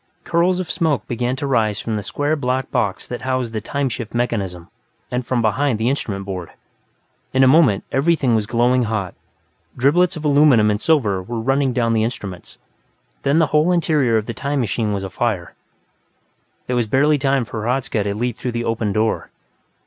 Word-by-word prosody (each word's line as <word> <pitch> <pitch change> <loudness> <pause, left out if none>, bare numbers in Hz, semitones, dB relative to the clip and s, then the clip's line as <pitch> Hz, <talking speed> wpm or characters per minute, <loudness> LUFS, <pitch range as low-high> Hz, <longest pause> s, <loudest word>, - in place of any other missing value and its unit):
Curls 175 +2 +1
of 185 - -3
smoke 155 -5 0
began 125 +1 -1
to 135 - -4
rise 110 -6 +1
from 115 - -3
the 105 - -2
square 145 +10 -1
black 130 -2 -2
box 100 -3 -1
that 125 - -6
housed 130 -3 -2
the 110 - -2
"time 140 +5 -2
shift" 120 -2 -5
mechanism, 100 -8 -2 0.4
and 125 +1 -1
from 120 -1 -1
behind 115 +3 +1
the 110 +3 0
instrument 100 -8 -3
board. 90 -3 -5 0.9
In 130 - +5
a - - +6
moment, 130 - +4
everything 140 -3 +2
was 110 -2 +1
glowing 120 +2 +2
hot: 105 -5 -2 0.6
driblets 165 +7 +3
of 155 - -6
aluminum 140 -7 +5
and 105 +1 -2
silver 110 - +2
were 115 +5 -5
running 135 +3 +1
down 120 -1 0
from - - +2
the 110 -1 +2
instruments. 100 -6 -6 0.6
Then 140 +3 +2
the 165 - +5
whole 155 +4 +4
interior 150 -9 +2
of 110 - -1
the 115 - -4
"time 140 +3 -2
machine" 110 -2 -1
was 100 -1 -2
afire; 95 -2 -2 1.1
there 125 - -2
was 120 -2 +1
barely 145 +6 +3
time 135 -2 +1
for 110 0 -6
Hradzka 125 0 -1
to 100 0 -2
leap 120 +1 -2
through 125 -2 -3
the 120 0 -2
open 115 -2 -1
door. 110 +2 0
120 Hz, 190 wpm, -20 LUFS, 110-140 Hz, 1.1 s, a